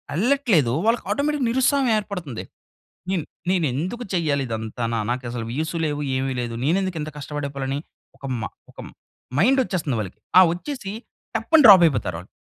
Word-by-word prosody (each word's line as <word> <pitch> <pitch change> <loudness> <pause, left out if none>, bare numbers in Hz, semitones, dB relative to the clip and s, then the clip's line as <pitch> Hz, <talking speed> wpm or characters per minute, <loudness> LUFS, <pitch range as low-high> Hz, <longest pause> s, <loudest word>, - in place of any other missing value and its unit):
ఎళ్ళట్లేదో 205 - +2
వాళ్ళకి 230 +2 +2
ఆటోమేటిక్‌గా 285 -3 0
నిరుత్సాహం 265 +2 +2
ఏర్పడతంది. 180 - -5 0.7
నేను, 180 -5 0 0.3
నేను 180 -3 +2
ఎందుకు 185 - -3
చెయ్యాలి 150 -6 +1
ఇదంతా? 110 +1 -4
నా 115 - 0
నాకు 125 +1 -2
అసలు 120 -2 -4
వ్యూస్ 160 +6 -3
లేవు 145 -1 -2 0.2
ఏమీ 135 0 -1
లేదు. 120 -1 -4
నేనెందుకు 185 +2 0
ఇంత 155 - -4
కష్టపడి 145 0 -4
పోవాలి 135 -1 -3
అని 140 +1 -1 0.4
ఒక - - -10 0.2
మా 100 - -3 0.2
ఒక - - -17
మ్ - - -14 0.4
మైండ్ 260 - +4
వచ్చేస్తంది 155 - -2
వాళ్ళకి. 95 -4 -6 0.2
ఆ - - +10
వచ్చేసి 195 +2 -6 0.4
టప్పని 295 +8 +4
డ్రాప్ 195 -4 +10
అయిపోతారు 125 - 0
వాళ్ళు. 90 +3 -10
160 Hz, 170 wpm, -23 LUFS, 135-225 Hz, 0.7 s, ఆ